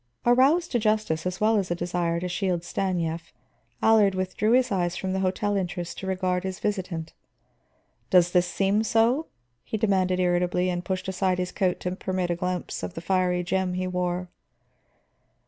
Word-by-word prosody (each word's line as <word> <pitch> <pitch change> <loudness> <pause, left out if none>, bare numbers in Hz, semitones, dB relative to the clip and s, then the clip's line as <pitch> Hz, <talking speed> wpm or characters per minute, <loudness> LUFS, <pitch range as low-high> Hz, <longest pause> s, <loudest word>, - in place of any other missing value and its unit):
Aroused 270 +9 +4
to 240 - +2
justice 215 -7 0
as 180 0 -4
well 220 +1 +3
as 195 -3 -1
a 175 - 0
desire 175 -1 -1
to 180 - -2
shield 180 -1 -1
Stanief, 170 -3 -2 0.5
Allard 210 -3 +5
withdrew 185 +4 0
his 255 -2 +3
eyes 175 -3 0
from 190 -1 -2
the 190 - 0
hotel 195 +2 0
entrance 180 -2 -3
to 190 - -7
regard 185 -1 0
his 190 -1 -4
visitant. 185 -6 -3 1.0
"Does 175 -1 +5
this 180 -1 +3
seem 195 +3 +1
so?" 230 +8 +2 0.4
he 220 - -3
demanded 190 -4 +1
irritably, 180 0 +1
and 175 0 -3
pushed 185 0 -3
aside 190 -1 0
his 180 0 -2
coat 185 -2 0
to 180 0 -2
permit 185 -2 -2
a - - +1
glimpse 180 +1 -3
of - - -5
the - - -4
fiery 180 0 +1
gem 185 0 -1
he 185 0 -1
wore. 180 0 -2
185 Hz, 175 wpm, -26 LUFS, 180-195 Hz, 1.0 s, Allard